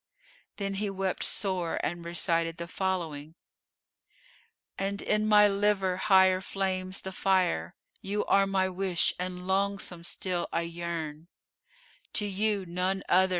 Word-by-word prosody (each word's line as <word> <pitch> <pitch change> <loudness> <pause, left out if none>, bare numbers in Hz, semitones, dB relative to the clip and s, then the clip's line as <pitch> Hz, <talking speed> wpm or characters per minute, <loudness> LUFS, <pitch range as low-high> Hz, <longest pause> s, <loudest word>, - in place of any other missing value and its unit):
Then 195 -1 -3
he 210 - 0
wept 195 -1 -2
sore 185 -4 0
and 170 +1 -2
recited 170 -1 0
the 170 - -5
following, 165 -5 -3 1.4
"And 200 +1 -2
in 215 0 +1
my 210 -1 +7
liver 200 -2 +1
higher 190 -1 +5
flames 190 -1 -2
the 190 - -5
fire; 185 - +1
* - - -31
You 205 +2 -2
are 195 0 +4
my 190 -1 +2
wish 185 -2 +1
and 180 0 -4
longsome 190 -2 -1
still 175 0 -2
I 165 - 0
yearn: 170 -2 -5 0.9
To 210 - +1
you 205 0 0
(none 185 +2 -1
other!) 190 +1 +5
190 Hz, 135 wpm, -29 LUFS, 170-195 Hz, 1.4 s, my